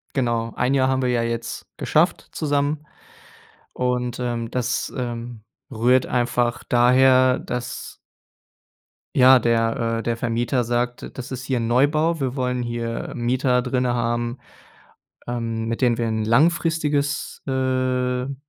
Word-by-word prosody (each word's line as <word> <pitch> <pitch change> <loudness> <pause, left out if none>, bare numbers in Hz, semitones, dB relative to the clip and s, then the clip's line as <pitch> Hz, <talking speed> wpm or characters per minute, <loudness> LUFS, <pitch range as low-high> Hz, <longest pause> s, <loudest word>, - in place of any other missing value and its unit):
Genau. 115 -3 0
1 135 +2 +1
Jahr 130 -1 +3
haben 130 0 +1
wir 125 - 0
ja 120 -1 +1
jetzt 115 0 -4
geschafft - - +1
zusammen. 145 0 -1 0.9
Und, 125 -1 -1
ähm, 120 -2 -3
das, 125 -1 -2
ähm, 120 -2 -5 0.3
rührt 125 +3 +3
einfach 120 -1 0
daher, 130 +1 +4
dass 125 0 -5 1.2
Ja, 130 0 +8
der 115 0 +1
äh, - - -5
der 115 0 -1
Vermieter 120 +2 0
sagt, 120 +1 -2
das 125 - -7
ist 130 0 -5
hier 130 -3 0
'n 115 - -1
Neubau. 150 +7 +2
Wir 130 -2 -2
wollen 125 -2 -1
hier 120 -1 -4
Mieter 125 +1 +1
drinnen 125 -1 0
haben, 120 +1 -1 0.9
ähm, 115 -2 -3
mit 115 +3 -3
denen 120 -2 +3
wir 115 - 0
'n 110 -1 -1
langfristiges 150 +2 +1
äh, - - -1
'ne 130 0 0
125 Hz, 135 wpm, -22 LUFS, 120-130 Hz, 1.2 s, Ja